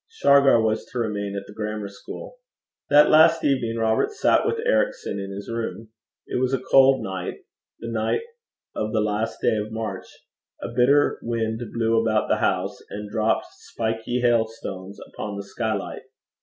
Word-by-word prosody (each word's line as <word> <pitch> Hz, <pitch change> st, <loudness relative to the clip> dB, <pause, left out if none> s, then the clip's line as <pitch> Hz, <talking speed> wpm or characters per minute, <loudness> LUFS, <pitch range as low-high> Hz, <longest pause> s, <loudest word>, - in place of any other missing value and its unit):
Shargar 140 Hz, -, +5 dB
was 110 Hz, 0 st, 0 dB
to -, -, -9 dB
remain 100 Hz, -3 st, -2 dB
at 100 Hz, -, -5 dB
the 105 Hz, -, -12 dB
grammar 105 Hz, -1 st, -4 dB
school. 100 Hz, -, -10 dB, 0.5 s
That 145 Hz, +1 st, +6 dB
last 160 Hz, +1 st, +6 dB
evening 125 Hz, -5 st, +1 dB
Robert 110 Hz, -, +1 dB
sat 425 Hz, -, +2 dB
with -, -, 0 dB
Ericson -, -, 0 dB
in 95 Hz, 0 st, -5 dB
his 100 Hz, +1 st, -7 dB
room. 115 Hz, -1 st, -4 dB, 0.4 s
It -, -, -2 dB
was 130 Hz, +1 st, +2 dB
a -, -, -3 dB
cold 135 Hz, -1 st, +4 dB
night 95 Hz, -3 st, -5 dB, 0.4 s
the 115 Hz, -, -8 dB
night 110 Hz, -, 0 dB, 0.5 s
of 110 Hz, 0 st, -2 dB
the 110 Hz, -, +2 dB
last 105 Hz, +1 st, -1 dB
day 110 Hz, -, +3 dB
of 105 Hz, +1 st, -4 dB
March. 110 Hz, -1 st, -5 dB, 0.5 s
A -, -, -5 dB
bitter 140 Hz, +4 st, +3 dB
wind 115 Hz, -1 st, -2 dB
blew 115 Hz, -1 st, +2 dB
about 110 Hz, -1 st, +1 dB
the -, -, +3 dB
house, -, -, -1 dB
and 105 Hz, 0 st, -7 dB
dropped 110 Hz, 0 st, +1 dB
spiky 115 Hz, +2 st, -3 dB
hailstones 110 Hz, -5 st, -1 dB
upon 105 Hz, -1 st, -5 dB
the 100 Hz, -, -5 dB
skylight. 110 Hz, 0 st, -3 dB
110 Hz, 165 wpm, -24 LUFS, 105-125 Hz, 0.5 s, That